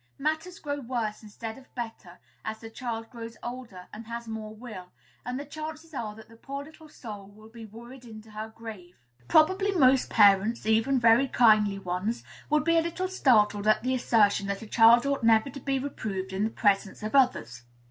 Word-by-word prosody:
Matters 315 +5 -2
grow 285 -1 -4
worse, 230 -5 -3
instead 220 +2 -8
of 260 - -22
better, 225 -7 -7 0.3
as 220 0 -4
the 225 0 -11
child 225 -1 -5
grows 230 -2 -9
older 240 -7 -8
and 220 +1 -9
has 235 0 -6
more 220 -1 -6
will; 210 -6 -10 0.3
and 250 +1 -4
the 285 - -6
chances 310 +2 -8
are 215 -6 -4
that 220 0 -14
the 230 +1 -17
poor 275 +4 -6
little 310 +1 -15
soul 210 -8 -9
will 215 +2 -16
be 230 0 -11
worried 235 +4 -12
into 220 -2 -12
her 215 +1 -6
grave. 220 -6 -10 0.3
Probably 375 +6 +4
most 265 -8 +4
parents, 210 +2 +4
even 225 +5 +2
very 235 +3 +5
kindly 215 -5 +4
ones, 190 +4 -3 0.3
would 300 0 +2
be 335 +1 +3
a - - +3
little 340 +3 -3
startled 215 - +3
at 215 +1 +3
the 255 +1 0
assertion 210 -5 +2
that 200 +2 -3
a - - -10
child 235 +3 +6
ought 280 0 0
never 225 +3 +4
to 275 - -8
be 275 +1 -1
reproved 200 -8 -4
in 195 +2 0
the - - 0
presence 205 -2 0
of 215 - -4
others. 125 - +2
230 Hz, 195 wpm, -27 LUFS, 215-270 Hz, 0.3 s, child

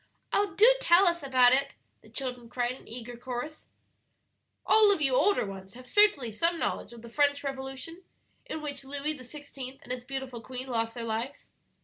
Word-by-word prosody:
"Oh, 405 -1 +1
do 435 - +7
tell 360 0 +6
us 340 0 +2
about 255 -3 +5
it," 275 +1 +1 0.3
the - - -18
children 250 -3 -5
cried 245 0 -1
in 255 - -11
eager 240 +1 -8
chorus. 250 +5 -6 1.0
"All 435 -1 +6
of 395 - +2
you 270 -3 +1
older 400 - +3
ones 195 0 -9
have 255 0 -11
certainly 290 - +3
some 335 +10 +1
knowledge 235 - -2
of 235 -1 -12
the - - -9
French 285 +4 +2
Revolution, 270 +5 -6 0.4
in 315 - -5
which 285 -2 -5
Louis 285 +3 -3
XVI. 270 -1 -9
and - - -9
his 250 -1 -4
beautiful 265 -2 -6
queen 255 +1 -7
lost 230 -2 -2
their 235 - -4
lives?" 230 +5 -4
265 Hz, 180 wpm, -29 LUFS, 245-300 Hz, 1.0 s, do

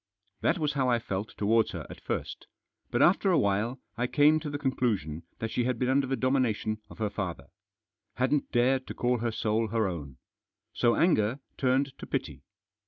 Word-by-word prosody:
That - - +2
was 150 -3 0
how 135 -3 +1
I 120 - +4
felt 100 -2 -5
towards 110 +2 +2
her - - -5
at - - -11
first. - - -4 0.4
But - - +2
after 195 +2 +4
a 175 - +4
while 105 +5 +1 0.2
I 125 - +1
came 150 +3 +4
to 155 -1 -5
the 145 - -3
conclusion 110 - -1 0.2
that 115 0 -4
she 120 - 0
had 125 -1 0
been 125 +2 0
under 135 0 +2
the 135 - 0
domination 120 -4 0
of - - -12
her 105 -2 -1
father. 95 -4 -4 0.7
Hadn't 135 +3 0
dared 130 +2 +2
to - - -6
call 125 0 +1
her 115 0 -1
soul 110 +1 0
her 110 -1 +1
own. 75 -8 -6 0.6
So 120 -1 +3
anger 130 - +2 0.2
turned 135 +1 +1
to - - -8
pity. - - -3
120 Hz, 190 wpm, -29 LUFS, 110-135 Hz, 0.7 s, I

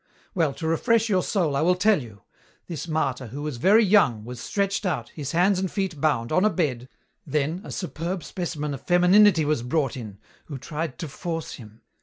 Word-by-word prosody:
"Well, 160 -8 0
to 160 - -6
refresh 225 +7 +2
your 190 -3 +3
soul 170 -7 0
I 140 - +1
will 180 +3 +3
tell 200 -1 +3
you. 110 -6 -12 0.4
This 170 0 -6
martyr, 135 -6 -1
who 140 +6 -7
was 150 -5 -4
very 210 - +5
young, 135 - +3
was 125 0 -7
stretched 200 0 -1
out, 150 - -2
his 140 -3 -6
hands 180 +3 +3
and 190 -1 -1
feet 190 -7 -3
bound, 135 -6 +1
on 185 +5 +3
a 215 - +5
bed, 130 - -2 0.3
then 150 +4 -1
a - - -9
superb 175 -1 -4
specimen 155 -5 -4
of 135 - -7
femininity 180 -1 +5
was 150 -4 0
brought 135 +2 -1
in, 110 -6 -8 0.3
who 145 - -7
tried 155 +1 -5
to 165 - -5
force 165 +3 -5
him. 110 -3 -13
160 Hz, 200 wpm, -25 LUFS, 135-185 Hz, 0.4 s, very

